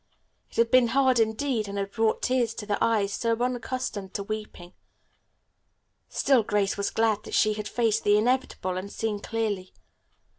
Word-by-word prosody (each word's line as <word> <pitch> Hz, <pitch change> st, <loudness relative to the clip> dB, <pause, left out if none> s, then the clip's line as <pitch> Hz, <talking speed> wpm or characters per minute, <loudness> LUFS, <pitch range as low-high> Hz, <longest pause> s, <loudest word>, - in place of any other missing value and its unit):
It -, -, -18 dB
had 230 Hz, 0 st, +3 dB
been 255 Hz, -2 st, +6 dB
hard 260 Hz, 0 st, +3 dB
indeed, 225 Hz, 0 st, 0 dB
and 200 Hz, 0 st, -5 dB
had 200 Hz, 0 st, -3 dB
brought 220 Hz, 0 st, 0 dB
tears 245 Hz, -3 st, +1 dB
to 210 Hz, -, -6 dB
the 205 Hz, -1 st, 0 dB
eyes 210 Hz, -3 st, +1 dB
so 230 Hz, +1 st, 0 dB
unaccustomed 245 Hz, -5 st, -3 dB
to 200 Hz, -, -2 dB
weeping. 205 Hz, -4 st, -7 dB, 1.4 s
Still 265 Hz, -4 st, +3 dB
Grace 205 Hz, -2 st, 0 dB
was 200 Hz, 0 st, -1 dB
glad 220 Hz, -2 st, +1 dB
that -, -, -5 dB
she 215 Hz, -1 st, +3 dB
had 210 Hz, 0 st, -5 dB
faced 225 Hz, -2 st, +1 dB
the 205 Hz, 0 st, +4 dB
inevitable 220 Hz, -5 st, 0 dB
and 195 Hz, +2 st, -5 dB
seen 215 Hz, -2 st, -2 dB
clearly. 210 Hz, -4 st, -3 dB
220 Hz, 170 wpm, -26 LUFS, 205-235 Hz, 1.4 s, been